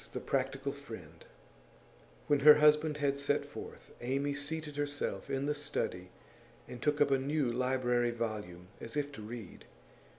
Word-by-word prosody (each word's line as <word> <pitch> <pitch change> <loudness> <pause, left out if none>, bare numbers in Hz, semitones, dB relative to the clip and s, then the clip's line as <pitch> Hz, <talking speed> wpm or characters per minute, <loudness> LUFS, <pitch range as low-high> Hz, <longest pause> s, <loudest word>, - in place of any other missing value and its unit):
THE - - -2
PRACTICAL 135 +1 -1
FRIEND 110 - -11 1.0
When 145 - +3
her 150 +2 +10
husband 150 0 +4
had 140 -1 0
set 140 - +1
forth, - - -10
Amy 135 +4 0
seated 150 +1 -4
herself 145 0 -3
in 135 +1 -1
the 150 - +1
study 145 -11 -3 0.6
and 120 - -9
took 150 0 +1
up 145 -1 +4
a 135 - +4
new 140 -1 0
library 125 -1 +1
volume 105 -7 -4
as 115 - -6
if 145 0 -1
to 120 - -9
read. 110 -2 -8
140 Hz, 155 wpm, -33 LUFS, 120-145 Hz, 1.0 s, her